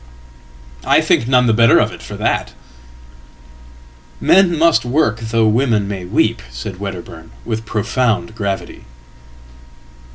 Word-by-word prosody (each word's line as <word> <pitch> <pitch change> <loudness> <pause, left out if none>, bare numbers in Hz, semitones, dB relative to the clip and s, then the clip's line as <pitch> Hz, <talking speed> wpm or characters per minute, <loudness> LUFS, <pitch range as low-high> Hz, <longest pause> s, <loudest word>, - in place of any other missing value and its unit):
""I - - +3
think 115 - +1
none 125 -1 +3
the 115 - +2
better 115 0 +5
of - - +2
it - - -11
for - - -9 2.0
that.""Men 180 - +3
must 165 +1 +3
work 125 -3 0
though 115 0 0
women 110 -2 +1
may 95 -3 -5
weep," 90 - 0
said 65 +10 -8
Wedderburn 90 -4 -8 0.2
with 110 +1 -4
profoundgravity." 110 -2 -2
110 Hz, 110 wpm, -17 LUFS, 100-125 Hz, 2.0 s, better